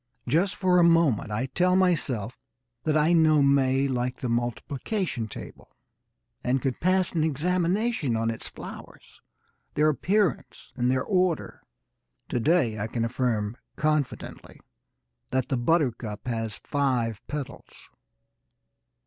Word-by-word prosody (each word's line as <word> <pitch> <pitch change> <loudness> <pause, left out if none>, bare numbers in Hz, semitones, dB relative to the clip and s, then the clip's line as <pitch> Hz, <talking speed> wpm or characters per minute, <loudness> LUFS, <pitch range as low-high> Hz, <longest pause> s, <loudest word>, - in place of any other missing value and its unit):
Just 170 +10 +2
for 185 -2 +2
the 175 - +6
moment 165 -11 +3
I 105 +5 -1
tell 180 +7 +2
myself 145 - +1 0.5
that 155 -1 +2
I 155 +3 +3
know 155 -3 +5
May 135 -1 +3
like 125 -1 -2
the 125 - -4
multiplication 120 - -2
table - - -11 0.7
and 125 +2 +1
could 130 0 -2
pass 185 +1 +2
an 160 -3 0
examination 175 - 0
on 115 0 0
its 110 - -7
flowers, - - -11 0.5
their 150 +1 +4
appearance 185 - -1
and 125 -1 +1
their 130 0 +1
order. 185 -4 0 0.7
To 125 - 0
day 120 -5 +2
I 105 - -2
can 115 0 -2
affirm 115 -3 -1 0.2
confidently 150 -3 -2 0.7
that 130 -1 0
the 135 - +1
buttercup 120 -6 0
has 115 -3 -3
five 125 -6 0
petals. 140 -2 -8
135 Hz, 125 wpm, -26 LUFS, 120-170 Hz, 0.7 s, the